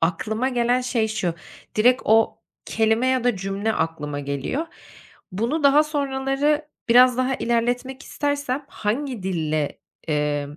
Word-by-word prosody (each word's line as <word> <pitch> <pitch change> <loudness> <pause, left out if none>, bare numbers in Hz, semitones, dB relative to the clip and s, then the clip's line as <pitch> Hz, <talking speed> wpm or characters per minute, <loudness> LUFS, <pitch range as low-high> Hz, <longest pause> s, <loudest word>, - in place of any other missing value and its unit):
aklıma 215 +9 0
gelen 245 0 +1
şey 240 -3 0
şu: 185 -6 -2 0.4
Direkt 245 +4 +4
o 225 +1 +3 0.3
kelime 225 +3 +1
ya 260 -2 +1
da 245 -5 +2
cümle 195 +3 -2
aklıma 150 -5 -3
geliyor. 140 - -3 0.7
Bunu 235 - -1
daha 280 +2 +6
sonraları 290 0 -1 0.2
biraz 250 +1 +6
daha 255 +1 +1
ilerletmek 245 +3 -1
istersem 285 -1 -2
hangi 240 +1 -3
dille, 155 -5 -2 0.3
emm, 150 -1 -1
235 Hz, 125 wpm, -23 LUFS, 190-265 Hz, 0.7 s, daha